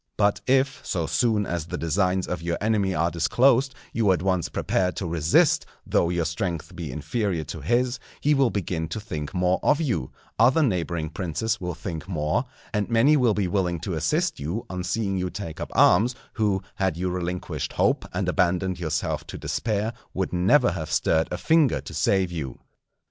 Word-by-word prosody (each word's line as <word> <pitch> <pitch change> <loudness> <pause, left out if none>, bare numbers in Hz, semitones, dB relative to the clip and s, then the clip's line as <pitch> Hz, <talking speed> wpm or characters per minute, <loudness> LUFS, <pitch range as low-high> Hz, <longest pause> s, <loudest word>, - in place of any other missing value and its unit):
But 100 -1 +2
if, 135 +1 +2
so 85 -4 -1
soon 110 +1 +1
as 85 -3 -3
the - - -4
designs 90 +3 0
of 90 - -3
your 85 0 -1
enemy 100 -3 +1
are 85 +2 +1
disclosed, 125 - +3 0.2
you 110 -4 +3
at 90 -1 +1
once 95 -3 +1
prepare 90 -1 0
to 95 - -4
resist 80 -1 +3 0.2
though 85 - +2
your 85 -2 0
strength 85 +1 -3
be 85 -5 -5
inferior 80 - -2
to 70 - -7
his, 125 +1 +1 0.2
he 150 - +3
will 135 -3 +3
begin 85 -6 -2
to 85 +7 -4
think 75 -9 -5
more 90 0 +2
of 150 - +3
you, 125 - -1 0.3
other 130 +8 +5
neighbouring 85 - -1
princes 100 +6 -2
will 90 -2 -3
think 85 -1 -6
more; 80 - 0 0.3
and 105 -1 0
many 120 +6 +5
will 125 -7 +3
be 100 -3 0
willing 90 -2 0
to 90 +1 -3
assist 155 - 0
you, 85 +11 -3
on 90 -1 -3
seeing 95 +1 -1
you 90 0 -1
take 85 -5 -6
up - - -4
arms, 115 +8 +5 0.2
who, 100 -4 0
had 95 -4 0
you 90 +1 -1
relinquished 90 0 -3
hope - - +2
and - - -2
abandoned 90 -1 +1
yourself 80 -3 -2
to - - -7
despair, 110 0 -1 0.2
would 95 -1 -2
never 90 +8 +4
have 80 -3 -5
stirred 80 +1 +2
a 90 - -3
finger 160 - +3
to - - -9
save 95 -2 +1
you. 70 -7 -5
95 Hz, 185 wpm, -25 LUFS, 85-110 Hz, 0.3 s, other